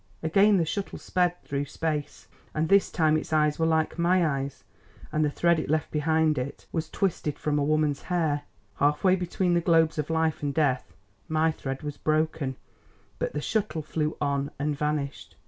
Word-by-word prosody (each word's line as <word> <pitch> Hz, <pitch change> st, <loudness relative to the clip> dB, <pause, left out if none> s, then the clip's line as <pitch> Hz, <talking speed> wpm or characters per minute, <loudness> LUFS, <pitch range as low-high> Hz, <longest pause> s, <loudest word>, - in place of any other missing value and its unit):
Again 195 Hz, +6 st, +4 dB
the 170 Hz, -, +2 dB
shuttle 200 Hz, +4 st, -3 dB
sped 180 Hz, -1 st, 0 dB
through 140 Hz, 0 st, -2 dB
space, 150 Hz, 0 st, -4 dB, 0.3 s
and 155 Hz, +1 st, +1 dB
this 200 Hz, 0 st, +5 dB
time 155 Hz, -2 st, +2 dB
its 155 Hz, -, -5 dB
eyes 150 Hz, -1 st, +2 dB
were 160 Hz, -, +3 dB
like 160 Hz, +1 st, +1 dB
my 175 Hz, +1 st, +3 dB
eyes, 140 Hz, -2 st, -3 dB, 0.5 s
and 155 Hz, -, +1 dB
the 150 Hz, -, +2 dB
thread 170 Hz, +3 st, +2 dB
it -, -, -4 dB
left 155 Hz, 0 st, 0 dB
behind 155 Hz, -1 st, +2 dB
it 130 Hz, +3 st, -6 dB
was 160 Hz, -1 st, -2 dB
twisted 170 Hz, -6 st, -1 dB
from 150 Hz, -1 st, 0 dB
a -, -, +1 dB
woman's 150 Hz, -1 st, +1 dB
hair. 160 Hz, -5 st, 0 dB, 0.4 s
Half 145 Hz, +1 st, +2 dB
way 185 Hz, -1 st, +5 dB
between 180 Hz, 0 st, 0 dB
the 170 Hz, -, +3 dB
globes 165 Hz, -2 st, +3 dB
of 150 Hz, -, -2 dB
Life 160 Hz, -1 st, 0 dB
and 145 Hz, -1 st, -2 dB
Death 130 Hz, -, 0 dB, 0.3 s
my 160 Hz, +1 st, +2 dB
thread 135 Hz, -2 st, -5 dB
was 145 Hz, -1 st, -5 dB
broken, 155 Hz, -3 st, 0 dB, 0.6 s
but -, -, -2 dB
the 150 Hz, -, -2 dB
shuttle 200 Hz, -4 st, -1 dB
flew 155 Hz, 0 st, -2 dB
on 140 Hz, -1 st, 0 dB
and 145 Hz, +1 st, -1 dB
vanished. 150 Hz, -1 st, -3 dB
155 Hz, 185 wpm, -27 LUFS, 145-165 Hz, 0.6 s, this